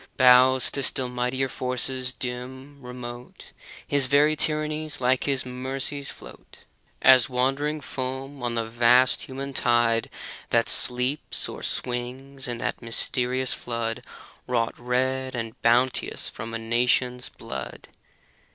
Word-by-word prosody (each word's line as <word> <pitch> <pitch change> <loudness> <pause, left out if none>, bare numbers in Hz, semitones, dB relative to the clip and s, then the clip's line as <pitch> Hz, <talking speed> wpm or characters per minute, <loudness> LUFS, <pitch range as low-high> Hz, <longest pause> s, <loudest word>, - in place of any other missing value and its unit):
Bows 130 0 +6
to 140 - -2
still 130 -1 0
mightier 125 +2 -1
forces, 130 0 0
dim, 130 +3 -6
remote; 125 -1 -9 0.4
His 140 -2 +3
very 145 +3 +4
tyrannies, 155 0 -1
like 130 0 +2
his 135 -2 +1
mercies^ 135 +2 -3
float - - -12 0.4
As 130 -2 +7
wandering 135 +4 0
foam 130 +1 -5
on 120 -1 -2
the 115 -1 -1
vast 120 +3 +4
human 135 +1 -6
tide 120 -3 +2 0.4
That - - +2
sleeps 125 +4 0
or - - -8
swings 130 +2 -4
in 120 -1 -2
that - - -3
mysterious 125 +2 +1
flood 115 0 -3 0.4
Wrought 115 -2 0
red 130 +2 -1
and 115 -2 -5
bounteous 120 +2 +1
from 115 0 -7
a - - 0
nation's 125 +2 0
blood. 65 -2 -8
125 Hz, 125 wpm, -25 LUFS, 120-135 Hz, 0.4 s, As